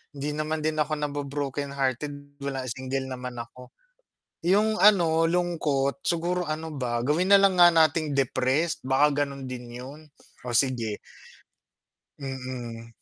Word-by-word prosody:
Hindi 145 +2 -3
naman 155 +1 -2
din 155 0 0
ako 150 0 0
nabo-broken 145 -1 -3
hearted 145 +2 -3
wala 140 -1 -3
single 130 +2 -3
naman 125 -1 -6
ako. 125 +2 -13 0.7
Yung 205 +5 +3
ano 170 -6 +5
lungkot 165 -4 0
siguro 175 +1 0
ano 155 0 -4
ba 125 -4 -2
gawin 170 +7 +1
nalang 195 -2 +6
nga 175 - +9
nating 160 -1 +3
depressed, 135 +4 +1
baka 140 +2 +3
ganun 140 -1 -8
din 125 -2 -7
yun, 130 +5 -9 0.5
oh, 120 - -3
sige. 115 -5 0 1.2
Mm, 130 -4 -6
145 Hz, 130 wpm, -26 LUFS, 130-160 Hz, 1.2 s, nga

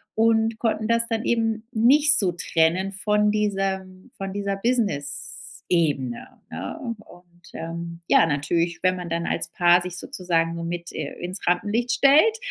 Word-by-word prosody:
und 225 0 +2
konnten 220 -2 -1
das 230 0 +2
dann 225 0 -2
eben 225 -2 0
nicht 285 +6 +6
so 185 -4 +2
trennen 175 +3 0
von 210 +1 +1
diesem 195 -3 -2
von 195 -1 -5
dieser 200 -1 -2
Business-Ebene, 155 - -2 0.2
ne? - - -6 0.2
Und 175 -3 -17 0.3
ähm, 170 +1 -7
ja, - - +5
natürlich, 165 +3 -1
wenn 185 0 +3
man 175 -1 -6
dann 170 +1 -2
als - - -2
Paar 175 0 +4
sich 180 0 -5
sozusagen 165 -2 -1
nur 170 0 -5
mit 170 0 -5
äh, 150 -2 -5
ins 180 +2 -6
Rampenlicht 210 +7 0
stellt, 290 - +5
190 Hz, 150 wpm, -23 LUFS, 170-220 Hz, 0.3 s, nicht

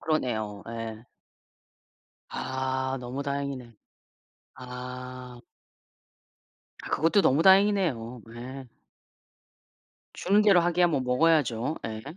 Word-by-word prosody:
그러네요. 110 -10 -2
예. 115 0 -6 1.2
아 130 0 -2
너무 125 +3 -5
다행이네. 140 -4 -4 0.8
아. 125 0 -8 1.4
아 - - -7
그것도 165 +5 +3
너무 145 +2 +3
다행이네요. 185 - +3
예. 130 +3 -8 1.5
주는 205 +3 +3
대로 195 -4 +6
하기야 175 +1 +3
뭐 145 -5 0
먹어야죠. 130 -1 +2
예. 110 -1 -6
130 Hz, 185 characters per minute, -27 LUFS, 125-160 Hz, 1.5 s, 대로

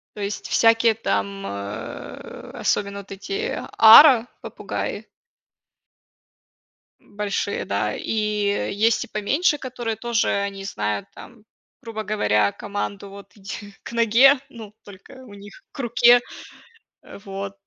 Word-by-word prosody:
То 210 - -7
есть 200 +1 -4
всякие 225 -1 +3
там, 100 - -3
э, 100 +1 -8
особенно 200 0 -1
вот 200 0 -13
эти, 395 - -4 0.2
ара 235 +1 +9
попугаи. - - -6 1.9
М, - - -24
большие, 205 -1 -2
да, 105 +1 -2
и 210 -2 -1
есть 230 +2 +3
и - - -19
поменьше, 285 - 0
которые 245 -4 -5
тоже, 235 0 -1
они 200 -1 -2
знают 105 - -3
там, 225 -3 -14 0.4
грубо 225 -3 -6
говоря, 105 - +1
команду, 200 0 -6
вот, 200 -1 -13
иди 205 0 -9
"к - - -9
ноге", 235 +4 +5 0.2
ну, 220 -4 -11
только 195 -1 -15
у 205 - -14
них 200 - -13
"к - - -14
руке". 240 -1 +5 0.8
Э - - -12
вот, 195 0 -7
205 Hz, 125 wpm, -22 LUFS, 195-230 Hz, 1.9 s, ара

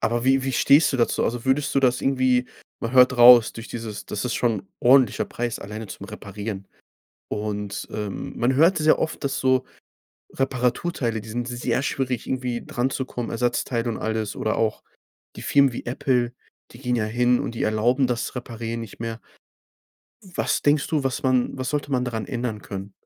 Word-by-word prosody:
aber 120 +2 0
wie 135 0 +3
wie 135 - -1
stehst 145 +5 +5
du - - 0
dazu? 120 - +1
Also 120 0 -2
würdest 135 +2 +1
du 135 - +4
das 125 -2 +2
irgendwie 130 -2 +2 0.3
man 115 +2 -3
hört 125 0 +6
raus, 120 -1 +8
durch 115 +1 -9
dieses 110 -3 -6
das 105 - -4
ist 125 - -1
schon 115 -5 +1
'n 95 - -25
ordentlicher 130 -2 +4
Preis 120 -1 -4
alleine 105 +2 -7
zum - - -9
Reparieren. 100 0 -7 0.6
Und, 105 -1 -4
ähm, 105 -2 -5
man 125 +2 +2
hört 165 +5 +4
es 155 - -1
ja 155 - +5
oft, 160 - -3
dass 140 0 -1
so 130 -1 +2 0.7
Reparaturteile, 125 -2 -1
die 110 - -11
sind 120 +2 -3
sehr 125 +1 -1
schwierig, 130 -4 -2
irgendwie 125 -2 -3
dranzukommen, 125 -1 -3
Ersatzteile 120 0 -1
und 115 - -3
alles 110 -2 -2
oder 110 - -1
auch 110 -1 0 0.5
die - - -8
Firmen 140 -2 +4
wie - - -6
Apple, 125 -2 0 0.4
die 120 - -13
gehen 125 -2 -1
ja 110 - 0
hin 120 +2 +2
und 120 - -4
die - - -3
erlauben 120 +5 +2
das 120 +1 -2
Reparieren 115 -2 -5
nicht 115 -2 -10
mehr. 115 0 -4 1.0
Was 185 -4 -1
denkst 145 0 +2
du, 150 -3 0
was 130 0 -1
man 130 0 +1
was 130 -1 -3
sollte 145 -1 -2
man 125 -2 +1
daran 115 -3 -3
ändern 120 -4 -4
können? 95 0 -7
120 Hz, 185 wpm, -24 LUFS, 115-130 Hz, 1.0 s, raus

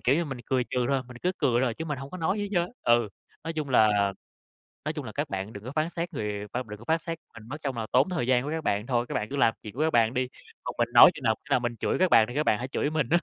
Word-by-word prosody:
kiểu 130 - +3
như, 170 +2 +1
mình 135 -4 -6
cười 130 -2 +1
trừ 125 -1 0
thôi, 135 -2 +1
mình 125 - -10
cứ 180 +1 +1
cười 125 -5 +2
thôi 120 -4 0
chứ 160 - -5
mình 150 -4 -3
hổng 135 +1 -8
có 185 - -6
nói 185 +5 0
gì - - -1
hết - - -4
trơn 175 - +3
á, 180 - -11 0.2
ừ. 120 -2 +1 0.4
Nói 165 - -3
chung 155 -3 -3
là 105 -5 +4 0.7
nói - - -1
chung - - -5
là - - -6
các - - -3
bạn 95 +3 -4
đừng 100 +1 -9
có 130 - -6
phán 155 +2 +1
xét 175 +1 -4
người 105 -4 -3
khoan 125 +1 -2
mình - - -18
đừng 105 - -7
có 115 - -13
phát 160 0 +1
xét 165 0 -5
mình, 115 -1 -12
mất 145 - -5
trông 135 -4 -2
là 110 - -3
tốn 130 +8 +4
thời 145 -9 -1
gian 125 -1 +3
của 145 - -4
các 160 0 -3
bạn 105 +3 0
thôi, 120 -2 +1
các - - -5
bạn 105 - -2
cứ 140 - -4
làm 115 -5 +4
chuyện 105 - -8
của 145 - -2
các 160 0 +2
bạn 115 0 +4
đi, 130 0 0 0.4
còn - - -5
mình - - +2
nói - - +10
chừng - - -10
nào, - - +3
khi - - -18
nào - - +4
mình 120 0 -2
chửi - - 0
các 185 -1 +4
bạn 110 - +7
thì 120 - -7
các 150 - +2
bạn 110 - +2
hãy 125 - -3
chửi 140 +2 -1
mình 150 -5 -1
á, 175 - +4
130 Hz, 350 wpm, -27 LUFS, 115-155 Hz, 0.7 s, nói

